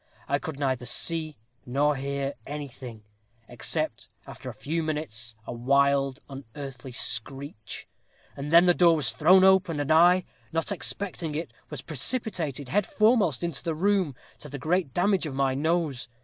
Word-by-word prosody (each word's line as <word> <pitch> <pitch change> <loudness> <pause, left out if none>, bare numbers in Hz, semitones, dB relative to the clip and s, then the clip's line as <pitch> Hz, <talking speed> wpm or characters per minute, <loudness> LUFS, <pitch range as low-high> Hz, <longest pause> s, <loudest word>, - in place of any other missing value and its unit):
I 140 +1 +1
could 155 -2 -6
neither 130 -4 -1
see 155 +2 0 0.3
nor 145 +4 +1
hear 140 +1 -2
anything, 130 -6 -7 0.4
except 120 +2 -3 0.2
after - - -9
a - - -7
few 165 +3 -2
minutes, 120 -8 -3
a - - -5
wild 140 +2 +2
unearthly 135 -1 -9
screech. 120 0 -4 0.5
And 140 +2 -5
then 170 +2 +8
the 175 - +6
door 170 -1 +5
was 135 -8 +2
thrown 185 +11 +5
open, 190 -4 +4
and 145 +1 -1
I, 175 +3 +6 0.3
not 165 +4 -1
expecting 180 -5 -2
it, 165 +3 -4 0.2
was - - -6
precipitated 165 - -3
head 205 0 +1
foremost 210 - +3
into 170 -6 -2
the 165 -2 -2
room, 185 -4 +1 0.2
to 150 - -10
the 145 - -6
great 160 +1 0
damage 180 +3 +1
of 135 - -6
my 135 -1 +2
nose. 155 -3 -1
150 Hz, 155 wpm, -27 LUFS, 135-170 Hz, 0.5 s, then